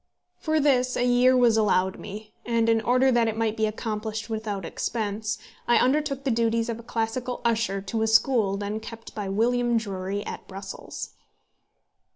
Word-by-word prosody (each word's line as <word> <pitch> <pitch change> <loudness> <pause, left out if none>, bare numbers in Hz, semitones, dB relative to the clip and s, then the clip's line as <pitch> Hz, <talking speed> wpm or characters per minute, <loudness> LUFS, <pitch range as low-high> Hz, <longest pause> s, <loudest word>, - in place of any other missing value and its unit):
For 315 -1 +1
this 255 -4 +2
a 245 - +2
year 250 +1 +5
was 235 -3 +4
allowed 190 -3 +2
me, 210 +1 -9
and 230 -1 +1
in 225 0 +3
order 255 +4 +3
that 240 -2 +3
it 220 0 -2
might 225 -1 0
be 220 -1 +1
accomplished 215 0 -4
without 210 -4 -3
expense, 210 +2 -2 0.3
I 240 - +5
undertook 275 +1 +1
the 265 - +1
duties 230 0 +1
of 230 0 -3
a 235 +1 -14
classical 240 +2 -2
usher 225 -4 +1
to 200 +3 -3
a 220 - +2
school 220 -3 +3
then 205 +1 -3
kept 225 +1 -10
by 205 -2 -4
William 240 +3 +2
Drury 200 -1 -3
at - - -7
Brussels. 195 0 -7
225 Hz, 175 wpm, -26 LUFS, 210-245 Hz, 0.3 s, year